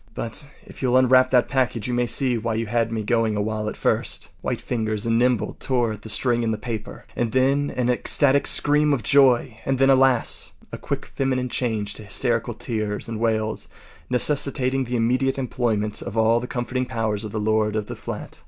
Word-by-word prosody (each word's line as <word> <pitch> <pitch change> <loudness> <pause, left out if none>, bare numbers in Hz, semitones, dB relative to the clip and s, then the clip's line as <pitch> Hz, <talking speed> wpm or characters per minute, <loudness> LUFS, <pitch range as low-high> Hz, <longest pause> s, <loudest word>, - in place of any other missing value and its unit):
But 115 +6 -5 0.2
if - - -13
you’ll 130 -1 +3
unwrap 130 0 +5
that 125 -2 +3
package 125 -5 -1
you 125 - -2
may 120 0 +1
see 130 0 0
why 115 0 -2
you 115 +1 -1
had 115 +1 0
me 110 -1 -2
going 115 -1 +1
a 105 - 0
while 105 0 -2
at - - -8
first.” - - -1
White - - -2
fingers 110 -3 -2
and 115 0 +2
nimble 125 -2 +1
tore 120 -4 0
at 105 - -10
the 110 - -8
string 120 +2 +1
and 110 -2 -1
paper. 110 -2 -6
And 115 -2 -1
then 135 +2 +2
an 125 -1 -1
ecstatic 140 +3 +2
scream 150 0 +4
of 120 - -6
joy; 130 -3 +3
and 135 -1 0
then, 135 +1 +4
alas! 130 -2 +2 0.2
a - - -7
quick - - -4
feminine 130 -2 -2
change 110 -5 -2
to 110 - -10
hysterical 115 +2 -1
tears 110 -2 -3
and 115 -1 -5
wails, 110 -1 -1 0.4
necessitating 135 0 +1
the 125 +1 -3
immediate 125 +4 +1
employment 115 -5 -1
of 105 +3 -6
all 115 +1 +4
the 125 - -6
comforting 125 +1 -3
powers 110 -3 -2
of 105 - -6
the 110 - -3
lord 110 0 +1
of 105 -1 -1
the - - -7
flat. - - -7
120 Hz, 200 wpm, -23 LUFS, 110-130 Hz, 0.4 s, unwrap